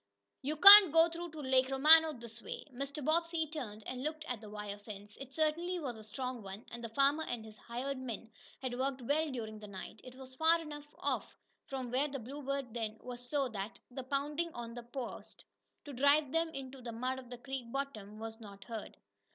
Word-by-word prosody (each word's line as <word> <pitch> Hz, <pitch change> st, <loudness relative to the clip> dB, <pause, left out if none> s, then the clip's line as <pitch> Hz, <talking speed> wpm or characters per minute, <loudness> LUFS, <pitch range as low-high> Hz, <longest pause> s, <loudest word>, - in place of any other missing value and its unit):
You 295 Hz, +3 st, -1 dB
can't 395 Hz, +1 st, +12 dB
go 325 Hz, +2 st, +6 dB
through 340 Hz, +1 st, -6 dB
to 310 Hz, -, -6 dB
Lake 260 Hz, -1 st, +3 dB
Romano 310 Hz, +4 st, +7 dB
this 235 Hz, -4 st, -9 dB
way!" -, -, -6 dB
Mr. 275 Hz, +2 st, -5 dB
Bobbsey 335 Hz, 0 st, +1 dB
turned 240 Hz, -9 st, -6 dB
and 255 Hz, 0 st, -4 dB
looked 310 Hz, +2 st, -3 dB
at 245 Hz, -7 st, -4 dB
the 215 Hz, -, -9 dB
wire 210 Hz, -1 st, -6 dB
fence. 205 Hz, 0 st, -10 dB
It 270 Hz, -1 st, -8 dB
certainly 320 Hz, +5 st, 0 dB
was 265 Hz, -7 st, -4 dB
a 220 Hz, -, -11 dB
strong 250 Hz, +3 st, -4 dB
one, 195 Hz, +2 st, -8 dB
and 235 Hz, 0 st, -7 dB
the 230 Hz, -, -4 dB
farmer 280 Hz, +6 st, +3 dB
and 240 Hz, -6 st, -4 dB
his 215 Hz, -1 st, -12 dB
hired 260 Hz, +3 st, -4 dB
men 230 Hz, -3 st, -6 dB, 0.3 s
had 250 Hz, -1 st, -3 dB
worked 265 Hz, -1 st, -1 dB
well 300 Hz, +5 st, +1 dB
during 220 Hz, -4 st, -5 dB
the 210 Hz, -, -9 dB
night. 200 Hz, +1 st, -9 dB
It 255 Hz, 0 st, -11 dB
was 260 Hz, 0 st, -11 dB
far 320 Hz, +5 st, +4 dB
enough 295 Hz, -2 st, -8 dB
off -, -, -2 dB, 0.3 s
from 260 Hz, -3 st, -4 dB
where 270 Hz, +4 st, +2 dB
the 280 Hz, -1 st, -4 dB
Bluebird 275 Hz, 0 st, -4 dB
then 220 Hz, -2 st, -3 dB
was 245 Hz, 0 st, -8 dB
so 285 Hz, -3 st, +1 dB
that 205 Hz, -1 st, -5 dB
the 265 Hz, +2 st, -5 dB
pounding 290 Hz, +5 st, -1 dB
on 235 Hz, -1 st, -6 dB
the 240 Hz, -, -6 dB
posts, 240 Hz, +1 st, -7 dB, 0.4 s
to 290 Hz, -, -7 dB
drive 285 Hz, +2 st, +4 dB
them 330 Hz, +1 st, +2 dB
into 270 Hz, -3 st, -7 dB
the 235 Hz, -1 st, -6 dB
mud 255 Hz, +3 st, -2 dB
of 250 Hz, -2 st, -12 dB
the 245 Hz, -, -7 dB
creek 245 Hz, -1 st, -6 dB
bottom, 225 Hz, -7 st, -4 dB
was 225 Hz, +1 st, -7 dB
not 200 Hz, -3 st, -11 dB
heard. 225 Hz, -3 st, -7 dB
260 Hz, 210 wpm, -34 LUFS, 230-295 Hz, 0.4 s, can't